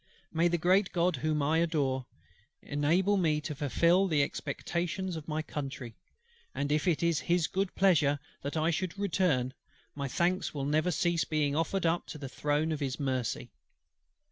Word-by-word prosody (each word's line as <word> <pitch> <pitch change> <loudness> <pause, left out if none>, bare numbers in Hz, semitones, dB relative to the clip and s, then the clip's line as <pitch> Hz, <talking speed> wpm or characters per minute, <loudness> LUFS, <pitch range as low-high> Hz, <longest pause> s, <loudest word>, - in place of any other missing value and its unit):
May 165 +1 +3
the 175 0 +1
great 185 +4 +3
GOD 175 -2 +2
whom 150 +2 0
I 155 +3 +2
adore, 140 -6 0 0.6
enable 170 +8 +2
me 155 -5 +2
to 150 - -4
fulfil 170 +7 +3
the 150 -5 +3
expectations 175 +5 -3
of 160 -1 -7
my 155 0 -2
Country! 135 -6 -6 0.6
and 140 +1 -1
if 155 +4 +1
it 170 -2 +2
is 170 -2 +2
His 175 -2 +1
good 195 +2 -2
pleasure 155 -7 +4 0.2
that 140 +3 -3
I 160 +2 +2
should 185 +3 -2
return, 175 -10 +1 0.4
my 140 -1 -3
thanks 175 +5 0
will 140 -1 -2
never 155 +4 +2
cease 170 -2 +1
being 150 -2 0
offered 165 +4 0
up 165 +1 +1
to - - -7
the 140 -2 -6
throne 150 +4 0
of 155 - -2
His 135 -2 -3
mercy. 130 -3 -2
155 Hz, 170 wpm, -30 LUFS, 145-175 Hz, 0.6 s, pleasure